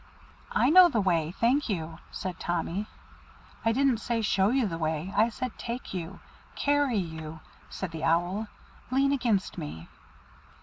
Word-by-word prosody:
"I 255 - +3
know 365 +1 +9
the 235 - 0
way, 170 -5 +1
thank 250 +4 +2
you," 165 -4 -3
said 185 -3 -5
Tommy. 175 +4 -2 0.8
"I 225 - +3
didn't 260 -1 +2
say 230 -1 -1
show 195 -1 +3
you 255 0 +2
the 165 -5 -3
way, 160 +3 -2
I 220 +2 +4
said 250 +1 -5
take 240 -1 -5
you 180 0 -5 0.4
carry 285 -4 +2
you," 160 -3 -5 0.3
said 190 -3 -5
the 160 -1 -6
Owl. 175 +6 +1 0.4
"Lean 270 +2 +3
against 235 -8 0
me." 80 +3 -7
200 Hz, 155 wpm, -28 LUFS, 165-245 Hz, 0.8 s, know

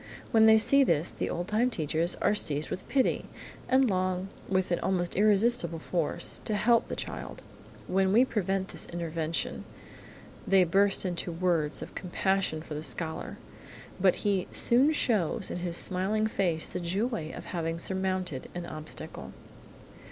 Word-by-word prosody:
When 220 -1 +6
they 220 0 +8
see 275 +5 +5
this, 165 - +1
the - - -3
old 175 +1 -3
time 225 +4 +2
teachers 165 - 0
are - - +4
seized 150 -7 +1
with 185 - -6
pity, 270 -2 +1 0.4
and 260 0 +4
long, 185 -1 -1 0.2
with 185 -1 0
an 175 - +1
almost 175 -2 -1
irresistible 215 -1 +3
force, 165 -1 -2
to 215 - 0
help 230 +2 +3
the - - -4
child. - - -6 0.4
When 190 +1 +1
we 235 +5 +5
prevent 195 -5 -1
this - - -1
intervention, 165 -1 -3 0.8
they 195 -1 +5
burst 195 +3 +2
into 175 -1 -2
words 165 -3 0
of - - -11
compassion 185 -3 -1
for - - -18
the 150 - -4
little 155 - -1
scholar, 160 -2 -4 0.6
but 185 0 +4
he 195 -3 +1
soon 260 +6 +3
shows 220 - 0
in - - -3
his 175 -1 -1
smiling 200 +4 0
face 180 -7 0
the 180 - -5
joy 185 0 -2
of - - -8
having 165 -1 -2
surmounted 185 -5 -3
an 175 -1 -4
obstacle. 155 -2 -8
185 Hz, 160 wpm, -29 LUFS, 170-210 Hz, 0.8 s, they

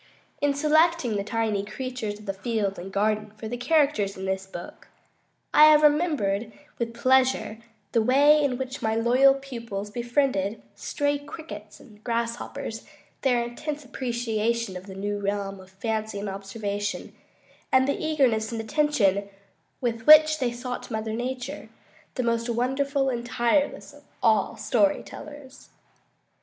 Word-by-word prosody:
In 285 -1 +2
selecting 310 -4 +3
the 200 - -1
tiny 215 -1 -1
creatures 215 -1 -5
of 195 -2 -5
field 205 -2 -2
and 190 +2 -8
garden 210 +1 0
for 220 - -6
the 240 - -4
characters 245 -7 +1
in 190 - -5
this 190 0 -2
book, 175 -2 -10 0.7
I 300 - +9
have 305 0 +6
remembered 290 - +2 0.3
with 230 -1 -3
pleasure 255 -3 +2 0.3
the 230 - +3
way 285 +6 +5
in 260 -3 0
which 260 0 -5
my 220 0 0
loyal 250 +4 +5
pupils 230 -7 -6
befriended 235 -4 0
stray 290 -1 -1
crickets 285 -8 -10
and 215 -4 -18
grasshoppers, 235 +1 -3 0.4
their 245 -3 +2
intense 290 +5 -5
appreciation 235 -4 -2
of 180 +2 -8
the 190 - -9
new 205 +1 -3
realm 200 -1 -3
of 185 0 -14
fancy 220 +2 -3
and 205 +1 -4
observation, 200 +1 -4 0.6
and 260 0 +4
the 280 - -1
eagerness 255 -9 +1
and 230 - -3
attention 220 -6 +1 0.5
with 230 -1 -2
which 310 0 +8
they 250 -2 0
sought 245 +1 -6
Mother 220 -1 -3
Nature, 255 +4 -4 0.5
the 255 - -1
most 230 0 0
wonderful 270 +3 0
and 240 -2 -2
tireless 255 +5 0
of 290 - -16 0.2
all 220 0 +3
story 210 -3 +2
tellers. 290 -2 -11
235 Hz, 145 wpm, -26 LUFS, 210-275 Hz, 0.7 s, I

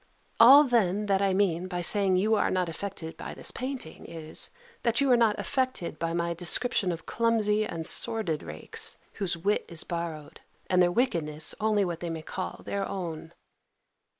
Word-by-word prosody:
All 265 +6 +9
then 210 -6 +1
that 195 -1 +1
I 195 -1 +2
mean 185 -3 +1
by 175 -1 -4
saying 195 -1 +3
you 215 +4 +2
are 215 - +2
not 185 -1 0
affected 165 -1 -6
by - - -7
this - - -2
painting, 255 -10 -6
is, 160 -1 -4 0.3
that 235 -1 +1
you 280 -2 +3
are - - +7
not 230 -3 +3
affected 255 - -2
by 165 0 -1
my 170 0 -1
description 180 +3 +2
of 165 -1 -6
clumsy 215 -2 +1
and 165 -1 -5
sordid 190 -8 0
rakes, 75 +1 -2 0.2
whose 180 -3 0
wit 200 +5 0
is 170 -2 -4
borrowed, 170 -3 -6 0.3
and 180 0 +4
their 175 0 +4
wickedness 160 - 0
only 210 -2 +2
what 170 -2 -4
they 170 - -4
may 160 -1 -5
call 185 +4 -6
their 200 -1 -2
own. 170 -5 -5
185 Hz, 175 wpm, -28 LUFS, 170-215 Hz, 0.3 s, All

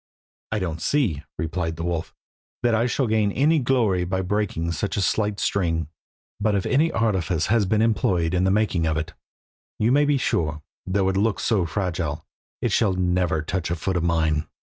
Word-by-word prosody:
"I 110 - 0
don't 85 -5 -3
see," 105 - +1 0.2
replied 80 0 -2
the 85 - -5
wolf, 85 -1 -3 0.5
"that 120 -1 +3
I 115 +2 +2
shall 130 +2 0
gain 110 -2 +1
any 150 +8 +3
glory 120 -9 +2
by 95 +1 -1
breaking 95 -4 -1
such 100 +6 -2
a - - +2
slight 105 +2 0
string, 80 -6 0 0.5
but 105 0 +1
if 100 - 0
any 155 +5 +2
artifice 95 -7 0
has 105 0 +2
been 110 +3 +2
employed 90 -6 +1
in 90 0 +2
the 95 - +3
making 95 -5 +1
of 80 -1 0
it, 80 - -4 0.6
you 110 +3 +2
may 145 +2 +4
be 145 -1 +2
sure, 75 - -1 0.2
though 95 +1 +1
it 95 - 0
looks 105 +1 +1
so 100 -7 +1
fragile, 80 -3 -3 0.4
it - - +1
shall 105 -5 +2
never 90 -3 0
touch 90 +1 -2
foot 85 +3 -2
of 90 - +1
mine." 80 -2 +1
95 Hz, 185 wpm, -24 LUFS, 85-110 Hz, 0.6 s, may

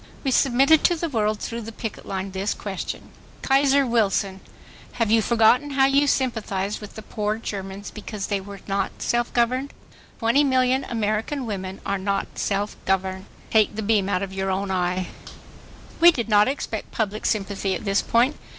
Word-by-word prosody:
We 270 - 0
submitted 275 +5 +4
to 350 - +4
the 335 0 -3
world, 215 -4 0
through 235 0 -4
the 225 0 -7
picket 225 -1 -7
line, 190 0 -3
this 195 +2 -2
question: 195 -3 -6 0.3
KAISER 275 0 +4
WILSON 200 -5 +1 0.5
HAVE 230 -3 0
YOU 225 0 +5
FORGOTTEN 235 +5 +4
HOW 270 - +6
YOU 280 +1 +3
SYMPATHIZED 215 -7 -1
WITH 210 - -10
THE 220 - -8
POOR 210 0 -2
GERMANS 200 -2 -6
BECAUSE 210 -2 -6
THEY 200 -2 -1
WERE 200 0 -10
NOT 195 -1 -2
SELF 240 0 0
GOVERNED? 255 +4 +1 0.5
20,000,000 260 +1 +2
AMERICAN 225 +5 -1
WOMEN 190 -3 -5
ARE 200 0 -1
NOT 195 0 -2
SELF 205 +1 -1
GOVERNED. 190 0 -1 0.3
TAKE 215 -1 +3
THE 220 - -3
BEAM 205 -2 +2
OUT 185 -1 0
OF 190 -1 -5
YOUR 190 0 -2
OWN 190 +1 -1
EYE. 180 0 0 0.9
We 340 - +9
did 240 -9 0
not 210 -1 +5
expect 255 -5 -3
public 215 -1 -2
sympathy 195 -2 -1
at - - -7
this 195 0 +2
point. 245 +6 +2
215 Hz, 170 wpm, -24 LUFS, 195-245 Hz, 0.9 s, We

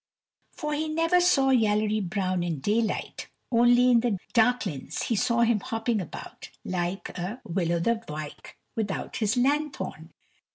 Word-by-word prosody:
For 300 0 -4
he 310 +2 -1
never 330 +3 +3
saw 270 -7 +4
Yallery 215 -3 +2
Brown 185 -1 -1
in 170 -4 -2
daylight; 215 +8 -1 0.2
only 240 +1 +5
in 235 - +6
the 230 -4 0 0.2
darklins 230 - +1
he 230 - 0
saw 235 +3 +2
him 230 -2 +3
hopping 225 +1 -1
about, 170 - -9 0.2
like 180 +1 -2
a 190 +7 -4
Will 170 -1 -1
o 170 - +1
th' 230 +5 -1
wyke 150 -1 -8 0.2
without 210 -4 -3
his 220 +2 0
lanthorn. 290 +3 -1
225 Hz, 150 wpm, -27 LUFS, 185-245 Hz, 0.2 s, in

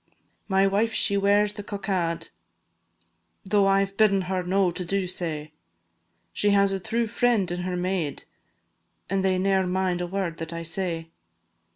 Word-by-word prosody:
My 195 0 +3
wife 210 +4 +1
she 200 - +4
wears 205 +1 +3
the 205 - -7
cockade, 190 -5 -2 1.2
Tho' 200 0 +3
I 195 0 +4
've 195 0 -16
bidden 200 -3 +4
her 185 0 -2
no 185 0 +1
to 180 +1 -3
do 195 +2 -1
sae, 160 -4 -3 0.8
She 205 - +1
has 200 -1 +4
a 195 - -1
true 230 +4 -1
friend 225 -4 +1
in 175 - -3
her 180 0 -3
maid, 180 -5 -2 0.9
And 195 -1 +1
they 190 -1 +2
ne'er 190 0 +1
mind 180 -1 0
a 175 - -2
word 180 -3 -3
that 165 0 -6
I 170 0 -5
say. 165 -1 -3
190 Hz, 165 wpm, -25 LUFS, 180-200 Hz, 1.2 s, she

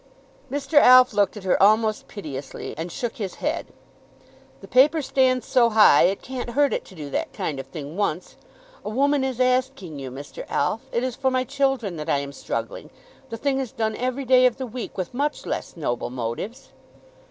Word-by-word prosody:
Mr. 285 +1 +3
Alf 255 -2 +7
looked 205 +1 +1
at 205 - -9
her 185 - +1
almost 215 +2 +3
piteously, 145 -9 -7
and 165 +3 -5
shook 240 +7 -4
his 200 -6 -4
head. 310 +3 -2 0.9
"The - - -12
paper 290 +5 +4
stands 255 -1 +2
so 240 -2 +3
high, 210 -9 +6
it 195 +2 0
can't 255 -2 -5
hurt 290 -1 +4
it - - -2
to 190 - -15
do 150 -4 -8
that - - -2
kind 140 -3 -3
of 135 - -7
thing 145 +2 -8
once. 185 -4 -2 0.5
A - - -4
woman 280 +4 +2
is 260 -2 -3
asking 255 - 0
you, 135 -1 -6
Mr. 140 +2 -8
Alf. 215 +10 0
It 235 - -1
is 255 -2 -2
for 265 -1 +1
my 255 0 +1
children 270 -8 -1
that 155 +1 -5
I 145 - +3
am 140 0 -4
struggling. - - -5 0.4
The 230 - -5
thing 270 +2 0
is 260 -4 -4
done 220 -1 -2
every 255 +3 -2
day 255 0 +6
of 245 - -2
the 265 - -4
week, 245 0 -7
with 185 +2 -4
much 290 +4 -2
less - - -4
noble 120 -6 -2
motives." 130 - -5
235 Hz, 200 wpm, -24 LUFS, 170-260 Hz, 0.9 s, Alf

